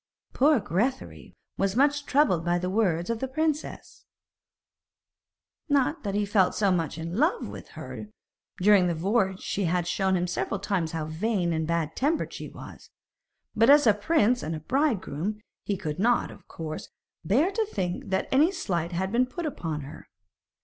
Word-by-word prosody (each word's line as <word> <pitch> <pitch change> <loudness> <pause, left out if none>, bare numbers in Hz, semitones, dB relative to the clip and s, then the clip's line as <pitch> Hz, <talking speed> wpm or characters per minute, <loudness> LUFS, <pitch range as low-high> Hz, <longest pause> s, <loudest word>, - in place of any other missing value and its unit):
Poor 290 0 +4
Grethari 220 +8 -3 0.2
was 195 0 +1
much 285 +2 +2
troubled 270 - +3
by 175 +1 +1
the 180 +1 -2
words 185 -3 +1
of 230 - -2
the 265 - -2
princess. 310 +3 -3 1.7
Not 285 +3 +2
that 200 -2 -3
he 205 0 +1
felt 200 -2 +2
so 200 -2 +2
very 180 - +3
much 165 -2 -3
in 165 +3 -5
love 335 - +1
with - - -9
her, 215 - -7 0.5
for - - -6
during 200 -3 +6
the 170 - 0
voyage 190 +2 0
she 200 - -2
had 175 0 0
shown 190 +2 +1
him 175 - 0
several 185 +2 -2
times 185 -5 -1
how 160 -1 -2
vain 175 +2 -1
and 160 -1 -1
bad 165 -2 -1
tempered 300 +5 0
she - - -7
was; - - -12 0.7
but 230 +3 +4
as 290 0 +7
a 215 - +6
prince 245 +2 +2
and 160 +1 -3
a - - -5
bridegroom, 210 - -1 0.3
he 200 - -1
could 155 -1 -4
not, 240 +4 +2
of - - -15
course, 155 -1 -7 0.3
bear 260 - +2
to 440 +2 0
think 185 - -3
that 190 0 0
any 300 +7 +4
slight 170 - -2
had 190 +2 -1
been 250 +2 +2
put 340 +6 -5
upon 165 - -3
her. 145 +3 -11
200 Hz, 180 wpm, -27 LUFS, 175-260 Hz, 1.7 s, as